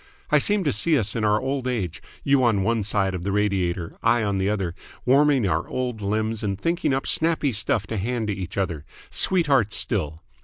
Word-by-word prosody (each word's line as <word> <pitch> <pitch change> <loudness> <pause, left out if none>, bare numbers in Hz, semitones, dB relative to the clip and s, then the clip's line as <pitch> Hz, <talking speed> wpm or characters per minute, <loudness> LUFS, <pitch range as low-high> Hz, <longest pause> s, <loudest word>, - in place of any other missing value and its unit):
I 150 - +5
seem 205 +6 +2
to 150 - +1
see 150 +10 +3
us 110 -5 -2
in 115 - -1
our 105 0 +3
old 135 0 -3
age, 95 -8 -3 0.2
you 140 -2 +3
on 110 -5 +2
one 115 +2 +1
side 100 -2 0
of 90 - -4
the 100 - -2
radiator, 95 -4 -1
I 115 0 +2
on 100 -2 -1
the 95 +1 0
other, 95 -5 -2 0.3
warming 135 -3 +4
our 85 -1 -1
old 125 -4 -3
limbs 110 +2 -1
and 100 -2 -3
thinking 170 - 0
up 135 0 -1
snappy 160 -3 +2
stuff 105 -1 +1
to 110 - -4
hand 115 +3 -2
to - - 0
each 95 -1 -6
other 85 -6 -2 0.3
sweethearts 140 - +2
still! 80 -7 -1
110 Hz, 205 wpm, -24 LUFS, 95-130 Hz, 0.3 s, I